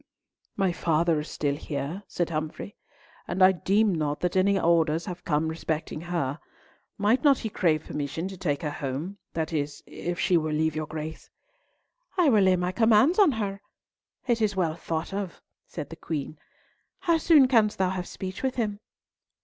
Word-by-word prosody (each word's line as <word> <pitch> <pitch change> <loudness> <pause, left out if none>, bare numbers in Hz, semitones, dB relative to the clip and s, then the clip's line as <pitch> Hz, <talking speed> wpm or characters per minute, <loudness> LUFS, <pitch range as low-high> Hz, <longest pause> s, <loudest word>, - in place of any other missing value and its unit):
"My 195 -3 +2
father 165 -1 +1
is 150 - -6
still 145 -2 -1
here," 145 +4 -4
said 175 -2 -2
Humfrey, 155 +6 -4 0.5
"and 185 +2 +1
I 185 - +8
deem 200 +3 +2
not 150 -3 -1
that 180 0 -1
any 195 +1 +3
orders 165 -1 +2
have 180 0 -7
come 155 0 +1
respecting 160 -1 -3
her. 165 -5 -2 0.6
Might 215 +6 +2
not 280 -3 +6
he 220 - -4
crave 160 -6 +1
permission 150 +4 -4
to 195 - -8
take 160 -6 -2
her 150 - -1
home, 145 +9 -4
that 160 0 -2
is, 145 -1 -3
if 175 0 -5
she 180 - +3
will 155 -1 -1
leave 160 0 +1
your 155 -1 -3
Grace?" 155 +1 -7 0.9
"I 350 -5 +5
will 215 -5 +5
lay 185 -1 +5
my 180 0 -1
commands 230 - +4
on 370 -9 +6
her! 200 -3 -3 0.6
It 235 -3 +1
is 210 -2 +1
well 170 -4 +1
thought 165 +2 -4
of," 195 -3 -4 0.3
said 150 -2 -7
the - - -6
Queen. 155 -2 -5 0.6
"How 335 -2 +2
soon 305 -5 +6
canst 225 -5 +3
thou 185 -1 +1
have 180 -1 -4
speech 190 -1 -6
with 260 -1 -1
him?" 210 -4 -1
175 Hz, 180 wpm, -27 LUFS, 155-205 Hz, 0.9 s, I